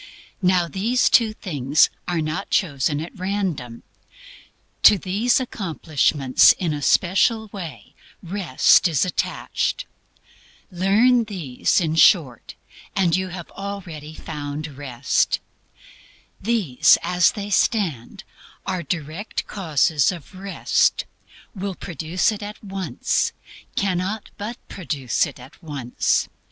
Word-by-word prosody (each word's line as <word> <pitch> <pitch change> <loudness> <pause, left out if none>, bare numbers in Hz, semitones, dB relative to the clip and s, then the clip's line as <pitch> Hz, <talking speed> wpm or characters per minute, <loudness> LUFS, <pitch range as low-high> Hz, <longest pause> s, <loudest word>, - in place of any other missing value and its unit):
Now 180 -2 +3
these 220 +8 +1
two 230 -3 +5
things 145 - +1 0.2
are 175 -2 0
not 155 +5 -3
chosen 145 -5 0
at 165 - -8
random. 180 - -3 1.0
To 205 - +8
these 205 +8 +1
accomplishments, 155 - +2
in 170 -4 -2
a 145 - -4
special 205 - +2
way, 160 - -8 0.3
Rest 180 -3 +3
is 160 -2 +1
attached. 340 - -2 0.9
Learn 220 +7 +3
these, 175 - 0
in 160 -3 -1
short, 160 - +3 0.4
and 175 -4 +2
you 185 0 -1
have 175 -2 -8
already 175 -7 -7
found 145 0 -6
Rest. 130 -4 0 1.0
These 200 - +3
as 180 -2 +3
they 205 -1 -6
stand 180 - 0 0.4
are 185 -2 -2
direct 160 +5 -4
causes 160 -5 +1
of 175 0 -10
Rest; 195 +1 0 0.5
will 195 -1 -4
produce 170 +5 -1
it 215 - -6
at 210 +1 -8
once; 190 -9 -1 0.4
cannot 195 +2 -2
but 220 +4 -5
produce 145 -9 -1
it - - -11
at 130 +7 -15
once. 140 -7 -1
180 Hz, 110 wpm, -22 LUFS, 150-200 Hz, 1.0 s, To